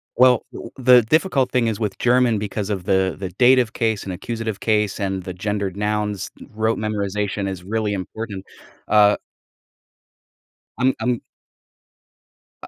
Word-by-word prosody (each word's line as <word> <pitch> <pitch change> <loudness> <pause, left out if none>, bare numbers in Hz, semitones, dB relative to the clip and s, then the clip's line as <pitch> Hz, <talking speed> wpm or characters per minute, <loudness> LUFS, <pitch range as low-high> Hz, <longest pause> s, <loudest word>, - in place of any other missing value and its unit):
Well, 125 -2 +5
t - - -8 0.2
the 125 -1 +6
difficult 135 - +1
thing 125 -2 +2
is 110 -3 -2
with 105 -3 -2
German 125 -2 +3
because 105 0 -3
of 100 -3 -2
the 95 0 +1
the 95 -1 -5
dative 120 +4 +4
case 110 -3 0
and 95 - -5
accusative 110 +1 -4
case 105 -2 0
and 95 -2 -2
the 90 - -6
gendered 100 0 -3
nouns, 105 -1 -2 0.2
rote 110 +1 0
memorization 105 -1 -2
is 90 -2 -6
really 105 +1 -1
important, 100 +1 -6 0.4
uh 105 -1 +5 1.6
I'm 130 +1 +3
I'm 120 +1 -1 1.4
I - - -8
105 Hz, 140 wpm, -21 LUFS, 100-115 Hz, 1.6 s, the